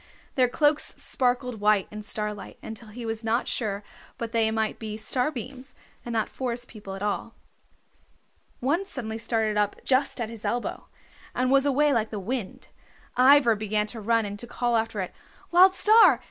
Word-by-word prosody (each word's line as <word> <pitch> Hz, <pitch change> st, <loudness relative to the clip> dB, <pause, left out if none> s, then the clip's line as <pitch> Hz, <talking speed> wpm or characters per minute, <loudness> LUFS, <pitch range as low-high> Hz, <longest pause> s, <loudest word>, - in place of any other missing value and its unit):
Their 255 Hz, -2 st, +3 dB
cloaks 295 Hz, +3 st, +1 dB
sparkled 250 Hz, -2 st, 0 dB
white 210 Hz, -2 st, +3 dB
in 215 Hz, 0 st, -6 dB
starlight 210 Hz, 0 st, -4 dB
until 225 Hz, +1 st, -8 dB
he 230 Hz, +3 st, -8 dB
was 225 Hz, 0 st, -2 dB
not 230 Hz, +2 st, 0 dB
sure 205 Hz, -3 st, -2 dB, 0.3 s
but 230 Hz, -1 st, -4 dB
they 225 Hz, -1 st, +2 dB
might 220 Hz, -1 st, -1 dB
be 215 Hz, -1 st, -5 dB
starbeams, 255 Hz, +2 st, -2 dB, 0.3 s
and 240 Hz, -, -6 dB
not 225 Hz, -2 st, 0 dB
Forest 245 Hz, -1 st, -4 dB
People 205 Hz, -4 st, -9 dB
at 195 Hz, -, -6 dB
all. 210 Hz, +2 st, -2 dB, 1.3 s
One 295 Hz, +9 st, +1 dB
suddenly 230 Hz, -, -3 dB
started 220 Hz, -2 st, 0 dB
up 205 Hz, -1 st, +1 dB
just 270 Hz, 0 st, +2 dB
at 235 Hz, -, -1 dB
his 225 Hz, -1 st, -10 dB
elbow, 240 Hz, 0 st, -3 dB, 0.5 s
and 255 Hz, +1 st, +1 dB
was 275 Hz, +1 st, +4 dB
away 290 Hz, +1 st, +3 dB
like 225 Hz, -3 st, +1 dB
the 210 Hz, -, -4 dB
wind. 220 Hz, +1 st, -5 dB, 0.5 s
Ivra 255 Hz, -2 st, +6 dB
began 210 Hz, 0 st, 0 dB
to 225 Hz, -, -7 dB
run 225 Hz, +1 st, +2 dB
and 205 Hz, 0 st, -6 dB
to 240 Hz, -, -7 dB
call 240 Hz, 0 st, 0 dB
after 225 Hz, -2 st, 0 dB
it. 185 Hz, -, -5 dB, 0.4 s
"Wild 370 Hz, +2 st, +7 dB
Star! 435 Hz, +3 st, +6 dB
230 Hz, 175 wpm, -26 LUFS, 215-255 Hz, 1.3 s, Wild